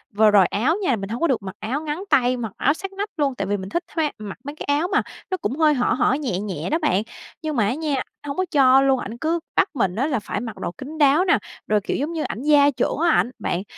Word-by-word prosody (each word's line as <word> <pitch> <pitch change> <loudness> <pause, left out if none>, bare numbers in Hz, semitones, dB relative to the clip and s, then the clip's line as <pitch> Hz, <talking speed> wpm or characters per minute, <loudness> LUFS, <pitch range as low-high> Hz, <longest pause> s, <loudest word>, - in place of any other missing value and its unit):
vừa 215 0 +5
rồi 195 -3 +6
áo 255 - +1
nha, 265 -9 +2
mình 195 -1 -6
hông 230 - -4
có 335 - +3
được 260 -8 +1
mặc 190 - -7
áo 255 +8 -2
ngắn 315 +4 -4
tay, 255 -3 +3
mặc 225 -4 -4
áo 285 - +3
sát 390 +4 -7
nách 405 +2 -3
luôn, 280 -3 +1
tại - - -2
vì 205 +1 0
mình 190 0 -7
thích 345 - -1
khoe 315 -2 +1
mặc 205 -2 -7
mấy 285 +2 -7
cái - - -7
áo 350 - 0
mà 410 - +2 0.3
nó 375 - +1
cũng 295 -5 -3
hơi 310 -1 +4
hở 245 -3 +1
hở, 255 - +2
nhẹ 240 -11 -2
nhẹ 200 -2 -4
đó 320 +3 +1
bạn. 220 - +1 0.4
Nhưng 310 -2 -3
mà 220 -5 +2
á 240 - +1
nha, 295 -3 -1 0.3
hông 280 +3 -4
có 370 - +1
cho 270 -2 +6
luôn, 270 -1 +3
ảnh 225 +4 -6
cứ 325 +5 0 0.2
bắt 390 - +3
mình 195 -8 0
á 265 +6 0
là 270 -6 0
phải 205 - -4
mặc 225 -2 -6
đồ - - -4
kín 280 - -9
đáo 295 +4 +4
nè, - - +4 0.3
rồi, 210 -1 +3
kiểu, - - -2
giống 300 +5 -2
như, 320 -2 -2
ảnh 220 - -4
gia 290 -1 +5
trưởng 255 - -1
á 340 +3 +2
ảnh 250 -5 +2
bạn, 175 +2 -2
275 Hz, 285 wpm, -22 LUFS, 220-310 Hz, 0.4 s, rồi